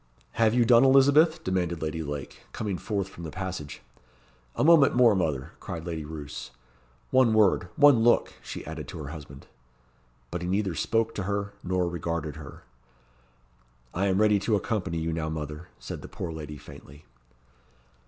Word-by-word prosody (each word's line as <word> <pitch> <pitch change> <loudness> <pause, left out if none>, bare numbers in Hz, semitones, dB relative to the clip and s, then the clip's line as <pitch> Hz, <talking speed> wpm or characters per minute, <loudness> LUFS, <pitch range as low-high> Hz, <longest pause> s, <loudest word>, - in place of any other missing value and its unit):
"Have 115 - +2
you 120 -1 +4
done, 120 +1 +6
Elizabeth?" 140 +5 +5
demanded 90 -3 -1
Lady 80 +1 -3
Lake, 75 -2 -7
coming 100 -5 -3
forth 100 -4 -2
from 95 -3 -11
the 80 - -5
passage. 90 -7 -6 0.7
"A - - 0
moment 150 -4 +6
more, 120 -3 +6
mother," 75 -9 -1
cried 80 -2 -6
Lady 80 -3 -4
Roos. 75 -3 -7 0.6
"One 130 -4 +4
word 100 -4 +3
one 145 -5 +6
look!" 120 +1 +3
she - - -7
added 80 -3 -7
to - - -8
her 70 - -7
husband. 70 -4 -10 0.9
But 90 - -3
he 90 - -4
neither 95 0 0
spoke 115 +8 0
to 100 - -4
her, 100 0 -2
nor 90 -1 0
regarded 85 -3 -3
her. 75 -2 -11 1.3
"I 95 +3 0
am 95 0 +2
ready 105 -1 +4
to 105 +2 +1
accompany 100 -5 -2
you 80 0 -2
now, 80 -1 -2
mother," 75 +2 -6
said - - -7
the - - -9
poor 85 - -6
lady 75 -2 -7
faintly. 75 +2 -14
90 Hz, 165 wpm, -27 LUFS, 80-110 Hz, 1.3 s, done